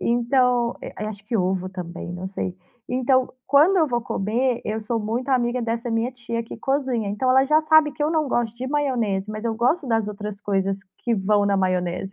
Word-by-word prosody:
Então 240 0 +2
eh, - - -7
a 215 - -3
acho 200 -2 -9
que 230 +1 -1
ovo 185 0 0
também, 175 -2 -7
não 180 +1 -5
sei. 185 -1 -4 0.3
Então, 255 0 +2
quando 300 +8 +5
eu 320 -3 +4
vou 240 -3 0
comer, 235 +4 -1
eu 220 +1 -2
sou 225 +2 -2
muito 230 +5 -3
amiga 245 -1 +1
dessa 230 +1 -2
minha 225 +2 0
tia 235 -2 -4
que 230 - -9
cozinha, 260 -6 -1
então 210 +6 -1
ela 265 +1 +5
já 305 +3 +4
sabe 310 -2 +5
que 295 - -4
eu 305 - +2
não 310 -3 +1
gosto 235 -2 -1
de 255 +2 -4
maionese 235 -9 0
mas 215 +1 -6
eu 225 -1 0
gosto 260 +7 +1
das 225 -3 +1
outras 210 -1 -6
coisas 195 -1 0 0.2
que 235 -2 0
vão 205 +1 +2
na 200 -1 +2
maionese. 185 0 -1
235 Hz, 215 wpm, -23 LUFS, 205-260 Hz, 0.3 s, quando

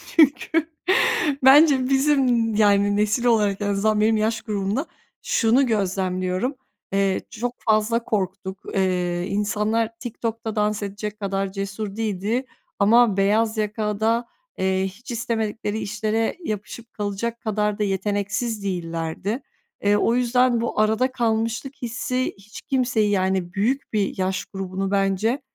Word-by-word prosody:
Çünkü 315 +1 +3 0.7
bence 270 -1 +6
bizim, 265 -5 +2
yani, 205 -1 +4
nesil 210 +3 +1
olarak 210 -4 +2
en 205 - 0
azından 210 +1 +1
benim 220 +1 +3
yaş 220 +2 0
grubumda 210 +5 -2 0.4
şunu 240 +4 +3
gözlemliyorum. 190 +2 -1 0.4
Eee, 195 -1 +2
çok 240 +2 -3
fazla 220 +2 +2
korktuk. 190 -2 -3
Eee, 180 -2 0
insanlar 210 +2 0
TikTok'ta 230 -2 -4
dans 210 0 0
edecek 205 +1 -5
kadar 195 -1 -2
cesur 195 +1 -5
değildi 220 +3 -1 0.3
ama 220 0 +5
beyaz 215 +3 +2
yaka 210 -1 -2
da, 230 +2 +1 0.3
eee, 190 0 +1
hiç 200 +6 -10
istemedikleri 220 -2 -2
işlere 215 - -1
yapışıp 215 -1 -6
kalacak 210 +3 -3
kadar 210 -1 -1
da - - +2
yeteneksiz 205 +3 -1
değillerdi. 175 - -3 0.4
Eee, 205 0 +4
o 230 +3 +2
yüzden 250 -1 +2
bu 230 - -2
arada 220 +4 +2
kalmışlık 230 +2 -1
hissi 250 +2 -2
hiç 210 +2 -12
kimseyi, 245 -5 +1
yani, 190 -2 0
büyük 230 +8 -1
bir 205 -2 0
yaş 190 0 -1
grubunu, 195 0 -4
bence, 200 +6 +1
215 Hz, 125 wpm, -23 LUFS, 195-235 Hz, 0.7 s, bence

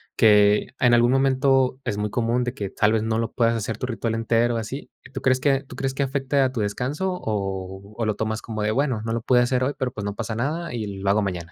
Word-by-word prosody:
que 105 -1 +5
en 125 -1 +4
algún 120 +1 +5
momento, 135 -1 +2
es 100 - -2
muy 105 0 -1
común 120 +2 0
de 125 - -3
que 100 -6 -4
tal 105 +3 +2
vez 110 -1 +1
no 110 0 0
lo 115 - -3
puedas 115 -1 +2
hacer 110 -1 -3
tu 125 - -3
ritual 115 -1 -2
entero 115 +1 +1
así, 120 +4 -5
¿y - - -15
tú 135 - -5
crees 130 0 +2
que 140 -2 +2
tú 125 - -11
crees 135 +1 -2
que 140 - 0
afecte 135 +1 -1
a 130 -1 +2
tu 120 - -2
descanso, 130 - -2
o 95 -1 -4
o 115 - -1
lo 110 -1 0
tomas 110 +1 -2
como 110 -2 -5
de 105 +1 +1
bueno, 130 -2 0
no 115 - -3
lo 115 - 0
pude 125 0 +4
hacer 125 +1 +1
hoy, 140 - -1
pero, 130 -1 -2
pues, 105 -3 -6
no 100 0 -3
pasa 110 0 -4
nada 150 +7 -2
y 110 -3 -3
lo 100 - 0
hago 105 +2 +3
mañana? 90 -4 -4
115 Hz, 265 wpm, -23 LUFS, 105-130 Hz, -, que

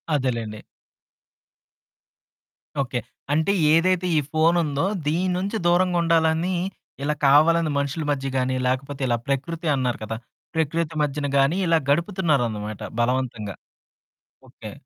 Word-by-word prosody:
అదేలేండి. 115 -6 -2 2.2
ఓకే. 125 -2 -2 0.3
అంటే, 160 +6 +2 0.2
ఏదైతే 180 +2 +3
ఈ - - +5
ఫోనుందో, 160 -2 +2 0.2
దీని 180 +4 +1
నుంచి 200 +4 -2
దూరంగుండాలనీ 170 -1 +2 0.5
ఇలా 150 - +1
కావాలని 155 +3 +5
మనుషులు 140 +2 -2
మధ్య 135 -1 -2
గానీ, 130 0 0
లేకపోతే 135 +2 -2
ఇలా 120 -1 +1
ప్రకృతి 160 +5 -2
అన్నారు 125 -3 -1
కదా! 110 +1 -4 0.4
ప్రకృతి 160 0 -1
మధ్యన 145 0 -2
గానీ, 140 +7 +3
ఇలా 165 -1 +4
గడుపుతున్నారనమాట 140 - 0 0.2
బలవంతంగా. 115 -5 -1 0.9
ఓకే. - - -10
150 Hz, 105 wpm, -23 LUFS, 130-170 Hz, 2.2 s, ఈ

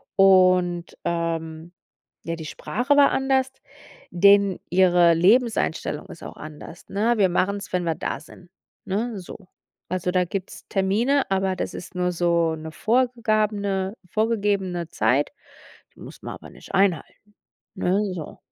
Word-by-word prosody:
und, 185 -2 +4
ähm, 165 -1 -3 0.5
ja, 165 0 -2
die 160 -1 -8
Sprache 250 - -1
war 285 -1 +6
anders, 265 0 0 0.5
denen 200 +1 +4
ihre 175 -2 +5
Lebenseinstellung 195 - +1
ist 170 - -11
auch - - -9
anders, 155 +2 -11
ne? 220 +4 +1
„Wir 195 -2 +4
machen's, 195 +2 -1
wenn 180 -1 0
wir 165 -2 -1
da - - -4
sind,“ 175 +2 -16 0.4
ne, 215 +2 -2
so. 180 - -9 0.5
Also 180 0 -1
da 180 0 +2
gibt's 190 +1 -6
Termine, 220 +9 +1
aber 190 -1 0
das - - -4
ist 185 - -9
nur 180 0 0
so 170 -1 +1
'ne 160 0 -8
vorgegabene 215 -4 0 0.2
vorgegebene 200 -6 0
Zeit, 125 +7 +1 0.6
die - - -21
muss - - -11
man - - -6
aber - - -13
nicht - - -14
einhalten, 195 -4 +1 0.6
ne, 190 +2 +1
so. 160 -4 -8
190 Hz, 140 wpm, -23 LUFS, 170-210 Hz, 0.6 s, war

